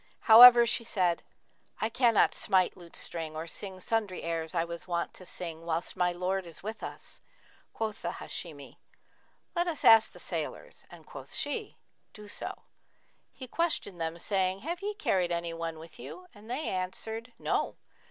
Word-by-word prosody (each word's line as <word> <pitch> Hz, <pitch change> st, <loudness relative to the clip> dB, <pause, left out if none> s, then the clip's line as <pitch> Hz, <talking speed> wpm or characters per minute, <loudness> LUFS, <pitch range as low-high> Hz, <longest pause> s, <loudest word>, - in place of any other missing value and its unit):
However 240 Hz, +1 st, +10 dB
she 235 Hz, 0 st, +2 dB
said, 180 Hz, -6 st, +1 dB, 0.6 s
'I 220 Hz, -, 0 dB
cannot 230 Hz, -2 st, +4 dB
smite 185 Hz, -3 st, +2 dB
lute 170 Hz, -2 st, -13 dB
string 160 Hz, -2 st, -4 dB
or 160 Hz, +1 st, -4 dB
sing 190 Hz, +2 st, -7 dB
sundry 210 Hz, -1 st, -1 dB
airs 165 Hz, 0 st, -3 dB
I 165 Hz, -, +2 dB
was 170 Hz, +1 st, -7 dB
wont 170 Hz, -1 st, -2 dB
to 185 Hz, -, -10 dB
sing 165 Hz, -2 st, -6 dB
whilst 165 Hz, 0 st, -2 dB
my 180 Hz, 0 st, +2 dB
lord 185 Hz, +1 st, -2 dB
is 165 Hz, -, -10 dB
with 220 Hz, +2 st, -5 dB
us.' -, -, -8 dB, 0.5 s
Quoth 220 Hz, -2 st, -4 dB
the -, -, -3 dB
Hashimi, 145 Hz, -6 st, -6 dB, 0.8 s
'Let 345 Hz, +1 st, +1 dB
us 325 Hz, -4 st, -3 dB
ask 225 Hz, -1 st, +8 dB
the -, -, -15 dB
sailors;' -, -, -5 dB
and -, -, -14 dB
quoth -, -, -8 dB
she, 290 Hz, -, -2 dB, 0.4 s
'Do 210 Hz, -1 st, -11 dB
so.' -, -, -5 dB, 0.7 s
He 260 Hz, -, -9 dB
questioned 240 Hz, -, -1 dB
them, 165 Hz, +1 st, -2 dB
saying, 190 Hz, +1 st, 0 dB
'Have 340 Hz, +5 st, -4 dB
ye 415 Hz, +1 st, -3 dB
carried 185 Hz, -, +1 dB
anyone 165 Hz, -1 st, -3 dB
with 160 Hz, 0 st, -13 dB
you!'; 365 Hz, -, -9 dB
and 215 Hz, 0 st, -15 dB
they 265 Hz, +6 st, -2 dB
answered, 220 Hz, +6 st, -4 dB
'No.' -, -, -1 dB
185 Hz, 165 wpm, -30 LUFS, 170-225 Hz, 0.8 s, However